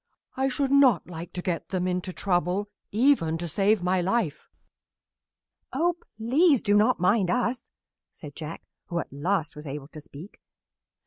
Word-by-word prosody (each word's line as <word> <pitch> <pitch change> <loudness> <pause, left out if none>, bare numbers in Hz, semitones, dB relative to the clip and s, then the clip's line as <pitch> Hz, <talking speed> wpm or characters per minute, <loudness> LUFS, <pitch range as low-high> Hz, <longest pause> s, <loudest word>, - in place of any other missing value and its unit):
I 265 +1 +1
should 270 +1 -1
not 280 -5 +5
like 170 -1 -8
to 180 - -5
get 175 -3 -3
them 185 -1 -1
into 180 0 -2
trouble, 185 +2 -1 0.2
even 215 - +3
to 170 +1 -4
save 195 +4 +2
my 180 0 +2
life." 185 -5 -1 1.2
"Oh, 340 +6 +1 0.2
please 275 +5 +3
do 205 - +2
not 210 -2 +4
mind 190 +1 +2
us," 245 +3 -1 0.4
said 145 -3 -11
Jack, 160 0 -7 0.2
who 170 - -3
at 165 - -4
last 160 +2 -1
was 150 0 -9
able 140 +1 -6
to 155 - -10
speak. 150 +7 -12
185 Hz, 155 wpm, -26 LUFS, 165-235 Hz, 1.2 s, not